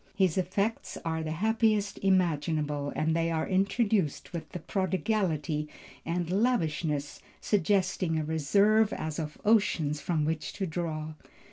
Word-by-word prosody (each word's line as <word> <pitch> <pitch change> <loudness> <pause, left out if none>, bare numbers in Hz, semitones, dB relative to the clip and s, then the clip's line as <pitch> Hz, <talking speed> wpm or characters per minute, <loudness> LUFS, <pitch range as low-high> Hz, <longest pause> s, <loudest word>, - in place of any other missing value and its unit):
His 185 -5 +2
effects 200 +4 -1
are 160 0 -1
the 160 - -4
happiest 215 +3 +1
imaginable 155 -6 +1
and 160 +1 +1
they 165 0 +1
are 160 -1 -1
introduced 195 - +1
with 165 -2 -4
a - - 0
prodigality 175 -5 -1 0.4
and 170 0 -1
lavishness 165 - 0 0.2
suggesting 190 -3 +1
a 155 - 0
reserve 200 +8 +3
as 155 0 -4
of 155 -1 -5
oceans 165 -9 +2
from 155 -1 0
which 160 0 -2
to 195 - -2
draw. 155 -2 -3
170 Hz, 130 wpm, -29 LUFS, 155-200 Hz, 0.4 s, reserve